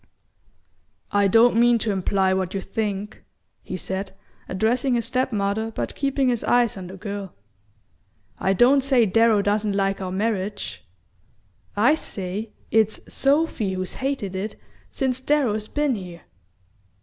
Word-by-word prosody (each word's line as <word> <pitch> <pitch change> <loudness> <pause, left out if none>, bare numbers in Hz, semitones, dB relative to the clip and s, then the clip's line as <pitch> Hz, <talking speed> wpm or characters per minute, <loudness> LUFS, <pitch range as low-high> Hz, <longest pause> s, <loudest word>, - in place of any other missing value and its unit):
"I 205 0 +3
don't 225 +4 +5
mean 240 0 +5
to 225 -1 -1
imply 190 0 +1
what 190 0 -2
you 195 - -1
think," 210 -1 -4 0.4
he 185 - -5
said, 190 +1 -4 0.4
addressing 240 +7 +1
his 235 - 0
step 255 0 0
mother 210 +1 -1
but 225 - -4
keeping 275 -2 0
his 240 -2 -1
eyes 240 -2 +3
on 185 -2 -7
the 190 +2 -9
girl. 200 0 -6 1.0
"I 190 - +2
don't 255 +8 +5
say 260 -3 +3
Darrow 220 0 +3
doesn't 205 0 0
like 195 0 0
our 185 -1 -3
marriage; 205 - -2 0.9
I 230 +8 +5
say 205 -6 -4 0.2
it's 220 -1 +2
Sophy 275 -8 +1
who's 185 -1 -4
hated 260 -8 -3
it 200 +3 -4 0.3
since 260 - -1
Darrow's 250 -7 +1
been 295 0 0
here!" 180 -6 -7
215 Hz, 140 wpm, -23 LUFS, 195-245 Hz, 1.0 s, don't